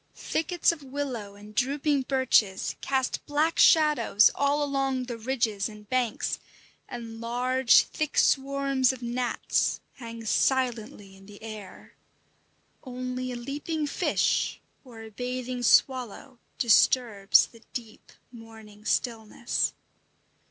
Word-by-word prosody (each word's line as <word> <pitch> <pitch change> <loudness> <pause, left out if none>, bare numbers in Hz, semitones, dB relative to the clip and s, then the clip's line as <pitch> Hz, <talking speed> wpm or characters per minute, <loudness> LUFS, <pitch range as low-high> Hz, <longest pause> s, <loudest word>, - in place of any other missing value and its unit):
Thickets 345 +2 0
of 335 -3 -8
willow 260 -7 -5
and 210 +1 -13
drooping 280 +4 +1
birches 250 -8 +1
cast 265 -2 -1
black 305 +3 0
shadows 300 -9 +5
all 285 +1 +1
along 270 -2 -1
the 245 -1 -6
ridges 225 -4 -1
and 210 -1 -13
banks, 245 -1 -1 0.5
and 230 -2 -8
large, 250 +2 +3
thick 305 -1 -4
swarms 275 -1 +2
of 255 -2 -10
gnats 240 +1 -1 0.2
hang 230 -2 -9
silently 230 -5 -1
in 195 0 -17
the 205 +1 -14
air. 215 -4 -10 0.9
Only 255 0 -5
a - - -5
leaping 290 +5 -4
fish 290 - 0 0.2
or 235 -4 -12
a 220 - -11
bathing 250 +2 -4
swallow 255 +1 +1 0.2
disturbs 225 -3 +4
the 230 - -18
deep 230 -3 -9 0.2
morning 220 -3 -14
stillness. 230 0 -1
250 Hz, 115 wpm, -27 LUFS, 225-270 Hz, 0.9 s, shadows